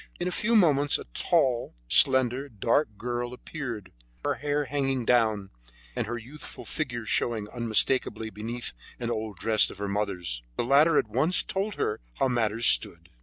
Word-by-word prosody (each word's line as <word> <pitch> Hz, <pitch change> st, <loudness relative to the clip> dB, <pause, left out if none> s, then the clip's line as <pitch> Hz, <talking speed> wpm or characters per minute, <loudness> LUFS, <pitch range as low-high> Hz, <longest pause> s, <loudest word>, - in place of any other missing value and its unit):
In 175 Hz, -, -1 dB
a -, -, -1 dB
few 235 Hz, +5 st, +1 dB
moments 145 Hz, -8 st, +4 dB
a -, -, -8 dB
tall, 130 Hz, -, +1 dB
slender, 130 Hz, -, +4 dB
dark 115 Hz, +1 st, 0 dB
girl 120 Hz, +1 st, -3 dB
appeared, 120 Hz, -, -7 dB, 0.3 s
her -, -, +2 dB
hair 145 Hz, 0 st, -1 dB
hanging 135 Hz, -2 st, -1 dB
down, 110 Hz, -5 st, +2 dB, 0.4 s
and -, -, -2 dB
her 120 Hz, +1 st, -3 dB
youthful 130 Hz, +6 st, -9 dB
figure 120 Hz, -7 st, -3 dB
showing 110 Hz, -2 st, 0 dB
unmistakably 115 Hz, -1 st, +1 dB
beneath 115 Hz, +4 st, -3 dB, 0.3 s
an 120 Hz, -1 st, -2 dB
old 110 Hz, -3 st, -4 dB
dress 110 Hz, +3 st, +3 dB
of -, -, -10 dB
her 100 Hz, 0 st, -3 dB
mother's. 95 Hz, -11 st, -2 dB, 0.2 s
The -, -, +1 dB
latter 150 Hz, +5 st, +5 dB
at -, -, +2 dB
once 135 Hz, -, +1 dB
told 195 Hz, +2 st, -3 dB
her 105 Hz, -, -1 dB, 0.2 s
how 135 Hz, -, +1 dB
matters 115 Hz, -2 st, 0 dB
stood. 85 Hz, -8 st, +2 dB
120 Hz, 165 wpm, -27 LUFS, 110-140 Hz, 0.4 s, latter